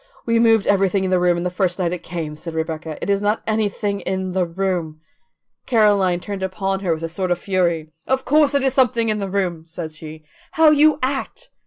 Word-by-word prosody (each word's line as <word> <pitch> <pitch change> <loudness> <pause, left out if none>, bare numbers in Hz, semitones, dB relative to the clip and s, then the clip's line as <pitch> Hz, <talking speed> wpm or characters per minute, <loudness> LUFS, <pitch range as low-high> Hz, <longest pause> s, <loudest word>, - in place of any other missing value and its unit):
"We 230 -1 +2
moved 225 -3 +4
everything 195 -1 +2
in 185 - -1
the 185 - +3
room 175 -1 +2
the 180 - -2
first 180 -1 0
night 180 -2 -1
it 180 - -5
came," 160 -3 -5
said 160 +1 -8
Rebecca; 160 -1 -4
"it - - -3
is 200 0 +1
not 210 +2 0
anything 210 -2 -1
in 190 -1 -3
the 180 -1 0
room." 170 -3 -2 0.7
Caroline 205 -6 +3
turned 200 +1 -6
upon 195 +1 -2
her 180 -4 0
with 160 - -9
a - - -1
sort 180 +3 -3
of 175 - +1
fury. 170 -4 -1 0.2
"Of 265 0 0
course 295 0 +3
it 280 - +2
is 265 -2 +1
something 235 -4 +2
in 215 0 0
the 195 -1 -3
room," 185 -4 -2
said 165 -1 -6
she. 155 0 -10 0.3
"How 320 -1 +6
you 305 0 +5
act! 280 - -3
190 Hz, 215 wpm, -20 LUFS, 170-215 Hz, 0.7 s, How